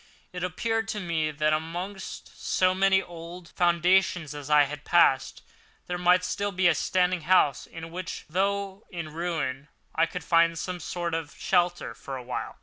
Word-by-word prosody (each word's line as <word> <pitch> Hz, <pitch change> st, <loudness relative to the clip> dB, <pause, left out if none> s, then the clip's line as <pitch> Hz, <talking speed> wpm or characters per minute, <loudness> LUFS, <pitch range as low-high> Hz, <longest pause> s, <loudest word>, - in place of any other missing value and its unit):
It 180 Hz, 0 st, -5 dB
appeared 225 Hz, +5 st, -1 dB
to 215 Hz, -, -3 dB
me 165 Hz, -4 st, -1 dB
that, 155 Hz, 0 st, +1 dB
amongst 175 Hz, +5 st, -5 dB
so 185 Hz, 0 st, +2 dB
many 190 Hz, 0 st, +3 dB
old 170 Hz, +1 st, -10 dB
foundations 175 Hz, -2 st, +2 dB
as 145 Hz, 0 st, -8 dB
I 150 Hz, -1 st, +6 dB
had 150 Hz, +1 st, -5 dB
passed, 135 Hz, -6 st, +3 dB, 0.4 s
there 180 Hz, 0 st, -3 dB
might 180 Hz, +1 st, +5 dB
be -, -, -14 dB
still 185 Hz, -4 st, +1 dB
standing 180 Hz, +3 st, +1 dB
a -, -, -14 dB
house 155 Hz, -6 st, +3 dB
in 165 Hz, 0 st, -9 dB
which, 180 Hz, 0 st, -6 dB
though 195 Hz, +3 st, -1 dB
in 165 Hz, -4 st, -6 dB
ruins, 155 Hz, -5 st, -3 dB, 0.3 s
I 165 Hz, +1 st, +2 dB
could 180 Hz, -1 st, -6 dB
find 165 Hz, +1 st, +3 dB
some 180 Hz, +2 st, -4 dB
sort 175 Hz, 0 st, -3 dB
of 160 Hz, -2 st, -4 dB
shelter 175 Hz, -7 st, +1 dB
for 135 Hz, +3 st, -7 dB
a 125 Hz, -, -8 dB
while. 125 Hz, 0 st, -5 dB
175 Hz, 170 wpm, -27 LUFS, 155-185 Hz, 0.4 s, I